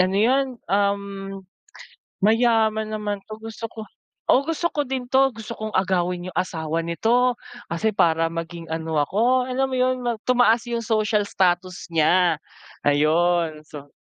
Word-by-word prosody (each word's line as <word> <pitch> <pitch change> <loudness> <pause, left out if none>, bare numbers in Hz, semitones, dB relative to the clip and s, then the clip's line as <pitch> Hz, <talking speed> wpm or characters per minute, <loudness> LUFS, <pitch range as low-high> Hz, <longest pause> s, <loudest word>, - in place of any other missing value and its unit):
ano 185 +1 +2
yun, 260 +5 +2 0.2
um, 200 0 +2 1.2
mayaman 220 0 +3
naman 210 -1 -3
'to 215 0 -9
gusto 225 +1 -8
ko 220 - -7 0.5
oh, 275 +3 +4
gusto 330 +1 -1
ko 290 -1 -2
din 255 -1 -4
'to. 270 -1 +3
Gusto 225 +1 -8
kong 215 -1 -5
agawin 180 -1 0
yung - - -4
asawa 165 -3 -2
nito. 240 +9 +2 0.3
Kasi 170 +7 0
para 165 -4 +2
maging 165 0 -6
ano 160 -2 -1
ako." 235 - +2
Alam 265 +1 +1
mo - - 0
yun 255 0 +2
mag 235 -2 -1
tumaas 245 -2 +4
yung 235 -1 -1
social 215 -2 +1
status 185 -2 0
niya, 165 +1 +3 0.5
ayon. 155 +2 +2
So, 145 -2 -11
205 Hz, 150 wpm, -23 LUFS, 170-235 Hz, 1.2 s, oh